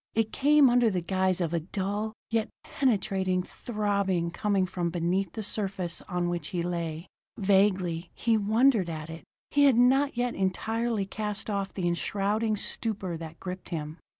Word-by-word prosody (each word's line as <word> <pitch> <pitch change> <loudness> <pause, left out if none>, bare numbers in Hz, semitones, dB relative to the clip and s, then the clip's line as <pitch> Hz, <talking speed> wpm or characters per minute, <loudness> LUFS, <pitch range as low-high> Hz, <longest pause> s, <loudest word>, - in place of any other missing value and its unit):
It 220 -1 +1
came 295 0 +5
under 240 -1 +4
the 180 -4 -2
guise 185 0 +1
of 170 -1 -1
a 170 - +2
dull, 200 +5 -3 0.2
yet 225 -1 +1
penetrating 190 -7 0
throbbing 200 -6 -1
coming 200 -1 +1
from 175 -2 -2
beneath 175 +2 -1
the 220 - -4
surface 195 -4 -2
on 180 -2 0
which 175 -3 -2
he 175 -2 -2
lay. 170 -2 -3 0.3
Vaguely 190 -4 +2
he 230 -1 +2
wondered 220 -1 +3
at 155 0 -5
it; 165 - -9 0.3
he 285 0 +5
had 265 -4 +5
not 265 +2 +4
yet 245 0 0
entirely 220 +3 -1
cast 210 +1 -4
off 200 -1 -2
the 180 -3 -2
enshrouding 205 +5 0
stupor 200 -4 -2
that 160 0 -9
gripped 180 0 -7
him. 155 -1 -5
195 Hz, 160 wpm, -28 LUFS, 175-220 Hz, 0.3 s, came